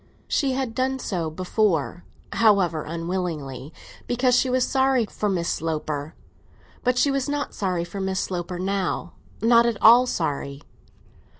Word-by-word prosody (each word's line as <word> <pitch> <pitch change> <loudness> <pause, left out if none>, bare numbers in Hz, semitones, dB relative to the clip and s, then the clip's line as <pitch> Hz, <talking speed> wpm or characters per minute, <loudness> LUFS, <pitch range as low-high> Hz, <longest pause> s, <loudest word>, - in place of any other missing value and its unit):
She 270 -2 +1
had 260 -3 -2
done 260 +2 0
so 175 -10 -3
before—however 180 +1 0
unwillingly—because 170 - -3
she 255 - +2
was 255 0 +1
sorry 265 -3 +2
for 210 0 -3
Miss 175 -3 -1
Sloper; 155 -1 -3 0.7
but 250 -1 +1
she 280 +3 +3
was 275 0 -1
not 290 0 -2
sorry 185 -4 -1
for 195 +3 -6
Miss 190 0 -1
Sloper 175 -1 -3
now—not 200 +5 0
at 230 -3 -1
all 240 +3 +7
sorry. 140 - -3
195 Hz, 125 wpm, -24 LUFS, 165-250 Hz, 0.7 s, all